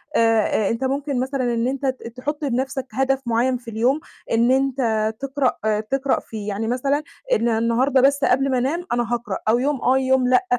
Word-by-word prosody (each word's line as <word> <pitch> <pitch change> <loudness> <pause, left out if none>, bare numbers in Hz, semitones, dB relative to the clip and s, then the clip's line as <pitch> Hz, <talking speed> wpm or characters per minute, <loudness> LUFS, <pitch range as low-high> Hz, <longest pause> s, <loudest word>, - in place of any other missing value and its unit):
آآ 225 -1 +4 0.3
آآ، - - 0
أنت 230 +3 -2
ممكن 275 0 -1
مثلًا 255 -2 -1
إن 230 +1 0
أنت 275 +1 -3
ت 260 -3 -2
تحُط 295 +4 -4
لنَفْسك 265 0 -2
هدف 270 0 0
معيّن 240 +2 +1
في 235 -1 -10
اليوم 245 +7 +1 0.3
إن 235 +2 +3
أنت 245 -5 +1
تقرأ 260 -6 0
تقرأ 270 +5 0
فيه، 210 -2 -8
يعني 210 +2 -2
مثلًا 275 +5 0 0.3
إن 235 - +2
النهارده 235 +4 +2
بس 280 +2 +4
قبل 270 +2 +3
ما 260 - +2
أنام 295 +8 -1
أنا 240 0 0
هاقرأ 235 -5 -2
أو 235 +2 +4
يوم 275 0 -1
آه، 260 +1 +3
يوم 260 -1 +2
لأ، 255 +8 +3
255 Hz, 195 wpm, -22 LUFS, 230-270 Hz, 0.3 s, آآ